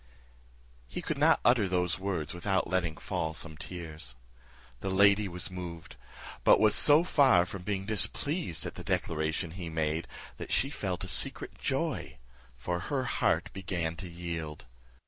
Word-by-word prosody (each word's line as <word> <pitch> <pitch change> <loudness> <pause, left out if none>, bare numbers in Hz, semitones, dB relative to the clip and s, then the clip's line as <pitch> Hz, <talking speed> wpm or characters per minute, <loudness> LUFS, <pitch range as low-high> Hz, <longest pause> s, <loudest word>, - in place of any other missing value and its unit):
He - - -6
could - - -3
not - - +5
utter 120 -5 +4
those 90 -1 0
words 95 -5 -3
without 95 +2 0
letting 85 -4 -1
fall 80 0 -3
some 80 -1 -6
tears. 80 -6 -8 0.6
The 95 - -3
lady 100 +2 +4
was 90 0 -4
moved; 85 -3 -8 0.5
but - - +6
was 110 -1 +5
so 150 +3 +7
far 135 - +4
from 95 +1 -7
being 95 0 -3
displeased 110 - +1
at - - -5
the - - -8
declaration 80 +1 -1
he 85 -1 -6
made, 80 0 -2 0.3
that - - -7
she 135 - +1
felt 95 -10 -3
secret - - +2
joy; - - -2 0.4
for 85 +7 -3
her 130 +9 -2
heart 125 - 0
began 85 -3 -3
to 90 0 -7
yield. 85 -4 -6
90 Hz, 150 wpm, -30 LUFS, 80-100 Hz, 0.6 s, so